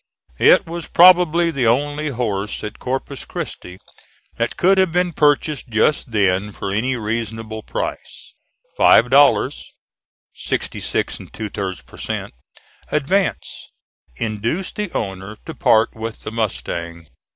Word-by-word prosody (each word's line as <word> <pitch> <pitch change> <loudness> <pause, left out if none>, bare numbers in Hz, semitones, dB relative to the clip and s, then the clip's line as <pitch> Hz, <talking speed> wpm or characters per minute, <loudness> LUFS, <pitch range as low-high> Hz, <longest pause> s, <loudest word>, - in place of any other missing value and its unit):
It - - +6
was 170 0 -6
probably 175 -1 +5
the 135 -6 0
only 145 +5 +1
horse 105 -7 -3
at 105 +1 -7
Corpus 135 +1 -4
Christi 90 0 -7 0.6
that 115 0 -2
could 190 +2 +4
have 190 -3 +3
been 180 0 0
purchased 150 -2 +1
just 115 +5 +1
then 100 -1 +1
for 100 0 -5
any 120 +6 0
reasonable 110 -1 -4
price. - - -6 0.4
Five 120 +3 +5
dollars, 140 +1 +3 0.6
sixty - - -3
six - - -2
and - - -12
two 110 -1 -5
thirds 95 -2 -5
per - - -15
cent. - - -4 0.6
advance, 180 +7 -1 0.5
induced 115 - -3
the 210 -4 -3
owner 95 0 -4
to - - -6
part 110 +1 +3
with 110 0 -6
the - - -6
mustang. 85 -7 -4
115 Hz, 130 wpm, -20 LUFS, 105-150 Hz, 0.6 s, It